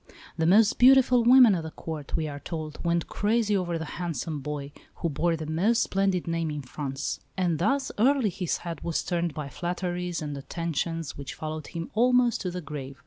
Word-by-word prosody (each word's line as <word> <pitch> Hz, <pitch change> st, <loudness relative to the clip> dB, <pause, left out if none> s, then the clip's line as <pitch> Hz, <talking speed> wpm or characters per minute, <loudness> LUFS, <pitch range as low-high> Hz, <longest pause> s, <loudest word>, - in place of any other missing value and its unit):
The 160 Hz, -, +1 dB
most 210 Hz, +4 st, +5 dB
beautiful 250 Hz, -1 st, +6 dB
women 245 Hz, -2 st, +8 dB
at 175 Hz, -, 0 dB
the 160 Hz, -, -6 dB
Court, 155 Hz, -2 st, -6 dB
we 160 Hz, -2 st, 0 dB
are 145 Hz, -1 st, -6 dB
told, 155 Hz, -1 st, -6 dB
went 170 Hz, -1 st, +1 dB
crazy 210 Hz, 0 st, +1 dB
over 175 Hz, -3 st, -1 dB
the 160 Hz, -, -4 dB, 0.2 s
handsome 165 Hz, -3 st, -3 dB
boy, 145 Hz, 0 st, -5 dB, 0.2 s
who 170 Hz, -, -2 dB
bore 165 Hz, +3 st, +1 dB
the 160 Hz, -1 st, -5 dB
most 185 Hz, +10 st, +2 dB
splendid 195 Hz, -3 st, 0 dB
name 165 Hz, -1 st, -1 dB
in 150 Hz, -1 st, -4 dB
France; 135 Hz, +1 st, -4 dB, 0.2 s
and 175 Hz, -4 st, +1 dB
thus 270 Hz, +10 st, +1 dB
early 255 Hz, -2 st, +3 dB
his 180 Hz, -1 st, -2 dB
head 170 Hz, -1 st, -5 dB
was 170 Hz, -1 st, -1 dB
turned 170 Hz, -4 st, -1 dB
by 150 Hz, -2 st, -4 dB
flatteries 175 Hz, +3 st, -3 dB
and 150 Hz, -2 st, -4 dB
attentions 165 Hz, +2 st, -3 dB
which 140 Hz, -, -6 dB
followed 155 Hz, -1 st, -5 dB
him 165 Hz, -1 st, -6 dB
almost 245 Hz, +1 st, +3 dB
to 185 Hz, -, -2 dB
the 180 Hz, 0 st, -5 dB
grave. 140 Hz, -3 st, -7 dB
170 Hz, 195 wpm, -27 LUFS, 155-195 Hz, 0.2 s, women